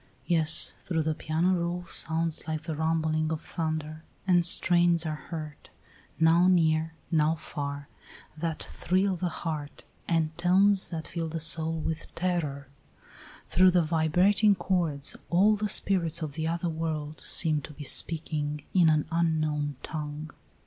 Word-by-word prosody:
Yes; 160 -2 +3
through 160 -3 -2
the 155 0 0
piano 160 +4 0
roll 175 0 -2
sounds 165 -1 -1
like 155 0 -3
the 160 -1 -4
rumbling 160 0 0
of 160 - -2
thunder, 155 -1 -4 0.2
and 180 -2 +4
strains 175 -1 +3
are 155 -1 -5
heard, 155 -3 -7 0.5
now 165 +2 +5
near, 160 -2 +2 0.2
now 155 -1 +2
far, 145 -2 -6 0.5
that 160 0 -3
thrill 190 +1 0
the 180 0 -2
heart, 150 -4 -6 0.2
and 160 -2 0
tones 190 +3 +4
that 165 -2 -5
fill 165 -2 -4
the 165 +1 -4
soul 160 0 +1
with 160 0 -5
terror; 160 -6 -2 0.8
through 185 +2 +5
the 180 -1 +3
vibrating 180 +6 +3
chords 175 -6 -1
all 200 +5 +4
the 210 0 -2
spirits 170 -5 0
of 150 -3 -5
the 160 +1 -3
other 170 +1 -2
world 155 -2 -4
seem 155 -3 +2
to - - -10
be 150 - -9
speaking 150 0 -1
in 175 -4 +5
an 155 -1 +2
unknown 155 -3 0
tongue. 150 0 -6
160 Hz, 145 wpm, -28 LUFS, 155-175 Hz, 0.8 s, now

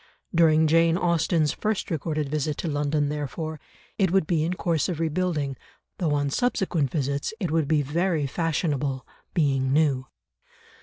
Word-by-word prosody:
During 160 -2 +5
Jane 165 +1 +4
Austen's 165 -3 +2
first 215 -3 -2
recorded 155 -1 -1
visit 150 0 -2
to - - -3
London, 145 -1 0
therefore, 150 +2 -4 0.4
it 190 -2 +3
would 190 -1 +2
be 160 -2 +1
in 175 +3 -1
course 165 -4 0
of 170 -3 -3
rebuilding, 160 -4 -1 0.4
though 160 -5 +1
on 145 -1 0
subsequent 180 - 0
visits 140 - -2
it 180 -7 -2
would 160 -3 +1
be 155 -1 +2
very 160 +1 0
fashionable, 145 -3 -1 0.3
being 135 -5 +2
new. 140 -3 +2
155 Hz, 150 wpm, -25 LUFS, 145-170 Hz, 0.4 s, During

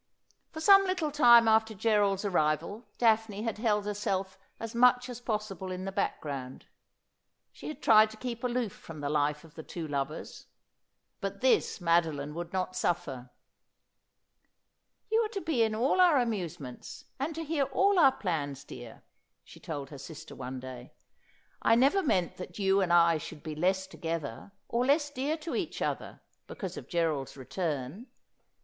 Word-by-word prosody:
For 315 - -7
some 390 +3 +7
little 355 -5 -1
time 240 -5 +7
after 220 0 +3
Gerald's 205 -2 +2
arrival 175 +5 0
Daphne 220 -3 +2
had 225 -2 -3
held 210 -3 +1
herself 195 -2 -2 0.2
as 225 -1 -6
much 250 +1 +4
as 245 -1 -7
possible 210 -5 -3
in 185 +1 -5
the 195 - -3
background. 135 -8 -4 0.9
She - - -10
had 305 - -7
tried 215 -1 +7
to 220 - -12
keep 235 0 -5
aloof 245 -3 -1
from 155 -2 -10
the 145 0 -2
life 150 0 0
of 160 -2 -16
the 165 - -8
two 160 0 -6
lovers; 140 +1 -4 0.7
but - - -5
this 475 - +2
Mado 170 -2 +3
line 145 +1 -6
would 170 +1 -6
not 185 -1 -2
suffer. 135 -8 -2 0.9
' - - -50
You 445 - +4
are - - -4
to 395 - -3
be 315 -7 0
in 220 -1 +2
all 265 +11 +2
our 345 -5 +6
amusements, 180 - -4
and 295 +4 -2
to 325 - -4
hear 305 -3 0
all 390 +9 +2
our 275 -5 +7
plans, 145 - -3
dear,' 120 -2 -11 0.4
she - - -15
told 145 -3 -6
her 140 - -9
sister 150 +2 -10
one 130 0 -6
day. 125 -1 -9 0.3
' - - -32 0.3
I 225 - +4
never 275 +11 +4
meant 185 - 0
that 180 -1 -8
you 195 -1 +3
and 180 -2 0
I 170 -2 +5
should 150 - -9
be 155 - -5
less 190 +5 +1
together, 165 - -5 0.2
or 235 +1 0
less 290 +2 +2
dear 290 +3 -2
to 320 +1 -6
each - - -3
other - - -3 0.3
because - - -6
of - - -9
Gerald's 160 -6 -1
return. 145 - -4
195 Hz, 170 wpm, -30 LUFS, 155-245 Hz, 0.9 s, some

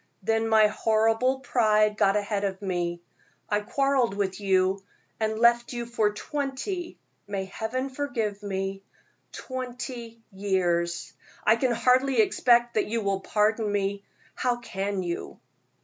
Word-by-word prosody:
Then 225 +2 +1
my 220 -1 +6
horrible 225 +4 +2
pride 215 -5 +3
got 195 -1 +3
ahead 205 -1 -1
of 195 -1 -2
me, 175 -2 -2 0.4
I 205 - +1
quarreled 265 -1 +1
with 195 -1 -2
you 190 0 +2 0.4
and 220 0 0
left 235 +1 +3
you 240 -1 -3
for 225 -3 +1
twenty 290 - -4 0.3
may 195 -1 -3
Heaven 225 +7 -3
forgive 245 -7 -3
me 195 -1 -3 0.5
twenty 245 -3 -6
years. 175 -4 -1 0.3
I 220 - +5
can 245 +1 +1
hardly 255 +2 +3
expect 240 +2 +4
that 215 - +1
you 230 +1 -1
will 200 -1 0
pardon 210 +2 +1
me. 200 0 -1 0.3
How 250 -1 0
can 195 -4 -3
you?" 170 -1 -5
220 Hz, 135 wpm, -27 LUFS, 195-240 Hz, 0.5 s, my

